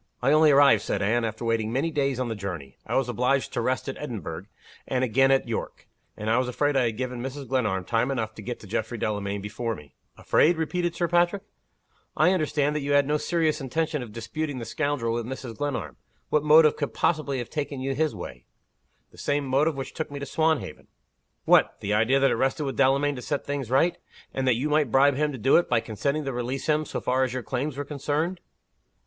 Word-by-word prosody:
"I 130 +3 +2
only 155 +1 +6
arrived," 140 -6 +6
said 100 - -2
Anne, 115 +4 +2
"after 110 +1 -3
waiting 115 -1 0
many 140 +7 0
days 140 -4 0
on 130 - -1
the 115 - -2
journey. 90 - -6
I - - -2
was 135 -2 +2
obliged 125 +3 0
to 125 - -1
rest 130 +4 -1
at 135 - -5
Edinburgh, 120 - -5 0.4
and 130 -1 0
again 135 +2 +3
at 135 -2 +3
York 115 - -5 0.3
and 105 - -5
I 115 +3 +3
was 130 - 0
afraid 145 +3 0
I 130 -2 +3
had 110 -2 -2
given 125 -1 -3
Mrs. 135 +1 -6
Glenarm 105 -8 0
time 115 +4 +1
enough 115 -5 -2
to 110 - -10
get 120 +3 -5
to - - -11
Geoffrey 110 +3 -3
Delamayn 100 -2 -2
before 110 +3 -3
me." 75 -5 -14 0.2
"Afraid?" 170 +2 +3
repeated 175 +1 -1
Sir 170 - 0
Patrick. 175 +3 +2 0.7
"I 180 - +5
understood 150 -4 +1
that 150 - -1
you 140 +1 -1
had 145 -1 +5
no 150 +2 +1
serious 160 -1 0
intention 155 +2 -1
of 120 -3 -8
disputing 130 +6 -4
the 120 - -5
scoundrel 145 -4 -1
with 115 -1 -3
Mrs. 130 -3 -6
Glenarm. 145 -3 -3 0.3
What 150 - +2
motive 155 0 +6
could 145 - -3
possibly 150 -4 0
have 120 -2 -5
taken 145 -3 -3
you 135 +1 -2
his 155 -3 0
way?" 65 -10 -9 0.6
"The - - -16
same 145 0 0
motive 140 +4 +2
which 135 -1 -6
took 160 - -4
me 145 - -7
to 140 - -4
Swanhaven." 155 - -1 0.6
"What! - - +4
the 100 - -2
idea 115 +6 +3
that 135 - +3
it - - +2
rested 135 +3 0
with 135 -2 -3
Delamayn 140 +2 +3
to - - -6
set 145 +2 -3
things 140 -4 -3
right? 135 +7 +2 0.3
and 135 -1 -1
that 125 - +4
you 130 +6 -1
might 150 -3 +2
bribe 140 +3 +5
him 150 +2 0
to 135 - -6
do 130 +4 +4
it, 175 - +1
by 120 - +3
consenting 140 +7 -2
to 135 - -2
release 125 +2 -3
him, 155 0 +1
so - - -4
far 130 +1 +1
as 130 -2 -1
your 130 -1 -3
claims 135 +3 -3
were 145 - -3
concerned?" 150 +5 -2
135 Hz, 225 wpm, -26 LUFS, 115-150 Hz, 0.7 s, only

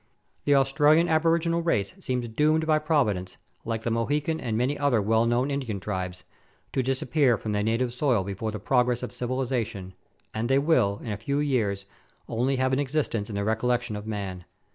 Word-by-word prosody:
The 145 - +4
Australian 150 +4 +4
aboriginal 165 +1 +2
race 105 - 0
seem 125 -1 -2
doomed 150 +7 +1
by 155 -1 +3
Providence, 125 - 0 0.3
like 115 -1 -3
the 120 - -1
Mohican 145 +7 0
and 110 -2 -2
many 130 +5 +1
other 140 -6 +2
well 110 +3 +2
known 125 +4 +1
Indian 130 -8 -3
tribes, 90 -2 -4 0.5
to 130 - +1
disappear 130 0 +1
from 110 - -4
their 105 0 0
native 115 +3 0
soil 125 -6 +1
before 100 +3 -4
the 105 - -4
progress 125 +2 +1
of 125 - -4
civilization, 120 -7 -3 0.4
and 115 +2 -2
they 135 - +4
will, 135 -9 +2
in 115 - -4
a 105 - -3
few 140 +7 -2
years, 110 -9 0 0.4
only 125 +4 0
have 130 0 +1
an 130 - +2
existence 135 -7 -1
in 105 - -5
the 100 - -1
recol 110 +3 -1
lection 120 -2 0
of 105 +1 -7
man. 95 -4 -5
125 Hz, 185 wpm, -26 LUFS, 105-140 Hz, 0.5 s, The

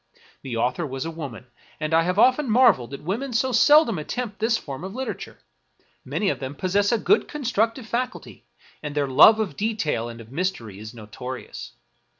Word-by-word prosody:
The 125 -4 -5
author 125 +8 0
was 135 0 -4
a 165 - -4
woman, 140 -8 -8 0.3
and 155 0 -3
I 165 - +5
have 180 +3 -1
often 255 +4 +4
marveled 215 - +4
that 140 - -9
women 235 - -3
so 260 +3 +1
sel 295 +7 +6
dom 210 -8 -3
attempt 215 +6 -5
this 225 +1 +2
form 140 +2 -8
of 190 +3 -7
literature; 265 0 -5 0.7
many 205 - -1
of - - -2
them 135 +1 -6
pos 185 +4 -3
sess 205 0 +3
a 235 - +3
good 405 - +2
constructive 235 -4 -1
faculty, 245 +3 -4 0.4
and 150 -1 -6
their 145 -1 +1
love 215 +12 +7
of 215 -4 -2
detail 200 - -1
and 115 0 -9
of 115 0 -13
mystery 135 - -3
is 110 +1 -8
notorious. 115 - -8
185 Hz, 190 wpm, -24 LUFS, -, 0.7 s, love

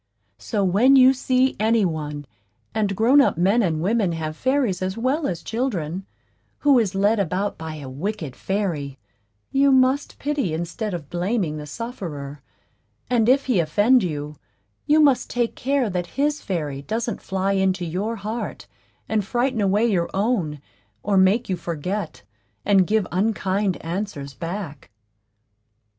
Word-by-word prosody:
So, 205 -3 -1
when 210 +9 +5
you 260 0 +7
see 260 0 +1
any 220 -1 +3
one 150 -3 -4 0.5
and 205 -3 0
grown 245 +8 +5
up 270 - +2
men 195 +7 +3
and 160 -5 0
women 200 -3 +1
have 155 -1 -4
fairies 255 - 0
as 185 +2 -2
well 270 +6 0
as 170 -3 -4
children 195 - -3 0.5
who 280 -4 +5
is 205 -4 -1
led 205 +3 +2
about 195 +2 -1
by 160 -1 -7
a 145 -3 -8
wicked 155 +1 -4
fairy, 165 -9 -2 0.5
you 275 0 +4
must 265 +2 +2
pity 280 - -1
instead 180 +5 -3
of 155 -5 -8
blaming 175 -3 -1
the 150 0 -7
sufferer; 150 - -6 0.7
and 235 -2 +3
if 275 +2 +4
he 245 -8 +2
offend 205 +11 +4
you, 150 -4 -4 0.5
you 300 +1 +5
must 285 -4 +4
take 240 -1 -1
care 270 -1 0
that 180 -3 -2
his 295 +2 +1
fairy 150 -8 -3
doesn't 225 - -3
fly 190 0 -1
into 190 -2 +1
your 195 +8 -2
heart 220 +3 -5 0.4
and 220 -2 0
frighten 240 +3 0
away 205 +3 +2
your 185 -7 +1
own, 195 -8 0 0.4
or 205 - +1
make 195 +6 +4
you 185 - 0
forget, 170 - -4 0.4
and 195 -3 +4
give 215 -2 +2
unkind 195 -1 0
answers 165 -6 -4
back. 165 -4 -6
195 Hz, 150 wpm, -23 LUFS, 170-235 Hz, 0.7 s, you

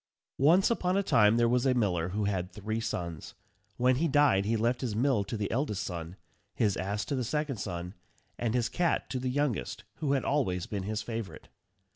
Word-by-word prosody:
Once 170 - +5
upon 185 -4 +1
a 200 - +2
time 105 - +4
there 120 0 +4
was 125 +1 +2
a 130 -2 +3
miller 90 -7 +1
who 105 +3 -2
had 95 -3 -1
three 110 +2 -3
sons. 85 -7 -4 0.4
When 125 +1 +3
he 165 +4 +2
died 145 -10 +4
he 115 +2 +1
left 120 +3 0
his 120 -5 -2
mill 125 -2 +2
to 110 - -4
the 105 -1 -2
eldest 115 -6 -1
son, 85 -1 -5 0.4
his 105 -5 +2
ass 100 +3 -2
to 145 - -2
the 130 - -1
second 145 +1 -2
son, 90 -2 -5 0.4
and 120 -1 -1
his 120 -2 +2
cat 175 -2 0
to 130 - -1
the 130 0 -2
youngest, 140 -3 -1
who 145 -3 0
had 135 - 0
always 95 -11 0
been 105 -3 -4
his 110 +1 -2
favourite. 115 -3 -6
115 Hz, 205 wpm, -30 LUFS, 100-135 Hz, 0.4 s, Once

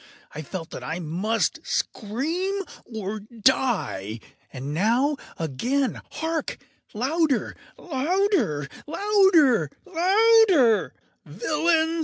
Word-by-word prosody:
I 155 - -5
felt 165 +2 -7
that - - -7
I 160 +2 -3
must 180 +7 -1
scream 330 - -2 0.2
or 215 -2 -5
die! 215 - 0 0.3
and 135 +2 -6
now—again!—hark! 260 - -1 0.4
louder! 285 +4 0 0.2
louder! 300 - 0 0.2
louder! 330 - +4 0.2
louder! 375 - +4 0.3
“Villains! 315 - +1
260 Hz, 75 wpm, -24 LUFS, -, 0.4 s, louder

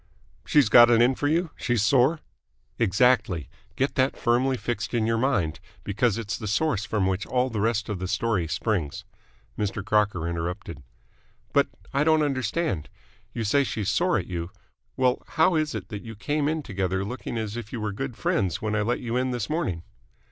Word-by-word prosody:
"She's 145 -5 +5
got 120 +2 +8
it 115 -1 +5
in 120 +3 +5
for 145 - -1
you? 165 +2 +1
She's 120 -4 0
sore?" 135 +7 +3 0.6
"Exactly. 100 - +2 0.3
Get 135 +1 0
that 130 0 +1
firmly 125 +2 +2
fixed 120 +2 -3
in 115 -2 +2
your 115 0 +1
mind, 100 - 0 0.2
because 110 +1 +1
it's 110 -3 -4
the 105 - -5
source 105 0 0
from 105 -4 0
which 95 +1 -1
all 125 0 0
the 105 -2 -2
rest 110 0 0
of 105 -4 -3
the 95 - -3
story 100 -4 0
springs." 85 -4 -2 0.6
Mr. 100 -1 -2
Crocker 105 -6 +1
interrupted. 85 -3 -4 0.7
"But - - +4 0.3
I 140 +2 +2
don't 155 0 +4
understand. 130 - -1 0.5
You 115 - -2
say 140 +7 +3
she's 105 -4 -2
sore 175 - +2
at - - -2
you. 85 -2 -4 0.5
Well, 130 -1 +2 0.2
how 160 +3 +5
is 155 -1 0
it - - -6
that 105 -2 -6
you 115 -1 -9
came 145 +7 -1
in 155 0 -1
together 95 -3 -2
looking 120 +1 -5
as 110 -1 -3
if 115 -2 -6
you 120 - -4
were 105 -1 -2
good 125 +3 -4
friends 95 -6 0
when 110 0 -2
I 105 - +1
let 120 +4 -1
you 120 -1 -3
in 130 +1 0
this 120 0 -3
morning?" 95 - -1
115 Hz, 190 wpm, -26 LUFS, 100-130 Hz, 0.7 s, got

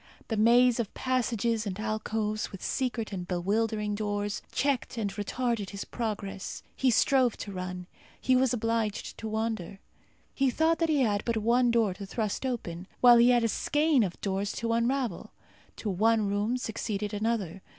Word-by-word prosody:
The 225 - 0
maze 240 +3 +5
of 225 -4 -2
passages 235 -3 0
and 195 0 -4
alcoves, 215 -1 -2
with 195 - -9
secret 245 -5 -2
and 180 -2 -4
bewildering 210 +4 0
doors, 205 -1 -2
checked 270 -3 -1
and 205 -3 -1
retarded 210 +1 -2
his 200 -1 -6
progress. 205 -4 -4
He 265 - +2
strove 250 0 +3
to 200 - -6
run; 180 -1 -5 0.3
he 260 - +2
was 255 -1 +3
obliged 225 -3 -1
to 220 - -5
wander. 220 -4 -3 0.6
He 270 -1 +2
thought 320 +6 +2
that 330 -1 +1
he 295 -3 +3
had 210 -4 +1
but 235 -1 0
one 240 +3 +3
door 230 -5 +2
to 195 +1 -8
thrust 215 +4 -2
open, 185 -8 -4
while 245 -1 +8
he 235 +1 +6
had 240 -1 +4
a - - +3
skein 295 +4 +2
of 185 -5 -2
doors 195 +1 -1
to 230 -1 -1
unravel. 235 -3 -1 0.4
To 210 - -3
one 220 +3 +2
room 205 +5 0
succeeded 210 -3 -3
another. 205 -4 -2
220 Hz, 170 wpm, -29 LUFS, 205-245 Hz, 0.6 s, while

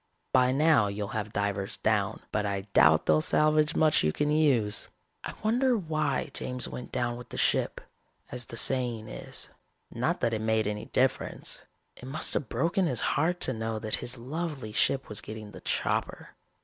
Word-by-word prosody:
By 125 0 +5
now 145 -5 +4
you'll 100 0 -4
have 110 -1 -3
divers 100 -1 -2
down, 105 -1 0
but 105 - 0
I 100 -1 -1
doubt - - +5
they'll 75 0 +4
salvage 155 - +3
much 155 -1 +4
you 75 - +3
can 150 - 0
use. 130 -10 +2 0.4
"I - - -6
wonder 245 +3 +3
why 155 -6 -1
James 125 0 -2
went 125 - -7
down 120 -1 -1
with 125 - -11
the - - -7
ship, - - +2 0.5
as 125 -1 -1
the 115 - -8
saying 120 -4 +2
is? - - -6 0.4
Not - - -1
that 115 - +1
it 110 - -1
made 110 0 +1
any 105 0 -3
difference. 130 +1 -1 0.3
It - - -12
must 140 +4 -1
have 135 - -2
broken 175 +2 +1
his 125 -7 -1
heart 175 +4 +1
to 130 - +3
know 110 -1 -3
that 110 0 -1
his 120 +1 -6
lovely 135 -2 -5
ship 135 +5 +1
was 105 -1 -2
getting 110 -1 -8
the - - -11
chopper. - - -2
120 Hz, 180 wpm, -29 LUFS, 110-150 Hz, 0.5 s, By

